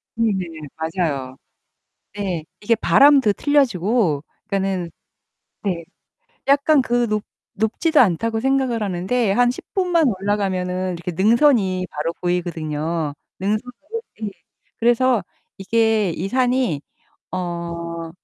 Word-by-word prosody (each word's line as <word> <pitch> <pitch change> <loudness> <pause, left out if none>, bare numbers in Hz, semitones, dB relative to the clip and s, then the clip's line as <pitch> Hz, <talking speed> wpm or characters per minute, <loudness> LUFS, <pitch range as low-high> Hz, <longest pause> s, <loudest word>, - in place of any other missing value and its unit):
네네. 185 -9 -1
맞아요. 160 -6 -2 0.8
네. 185 -6 -3 0.2
이게 230 +2 +2
바람도 270 -1 +5
틀려지고 220 - +2 0.2
그니까는 190 -3 -1 0.7
네 180 -4 -1 0.6
약간 280 0 +4
그 240 0 +1
높 215 0 0 0.3
높지도 290 +10 +1
않다고 225 +2 +2
생각을 265 -3 +1
하는데 195 +4 0
한 245 +3 +4
10 250 - -7
분만 355 -4 +2 0.2
올라가면은 185 -2 -1
이렇게 175 +1 -5
능선이 200 - +3
바로 155 +3 -2
보이거든요, 165 -3 -2 0.3
능선 210 +2 +1 0.6
끝이. 215 -2 -4 0.5
그래서 240 -3 +3 0.3
이게 220 -1 +2
이 175 +4 -3
산이 250 - +1 0.5
어 170 -2 -4
195 Hz, 230 characters per minute, -21 LUFS, 170-240 Hz, 0.8 s, 바람도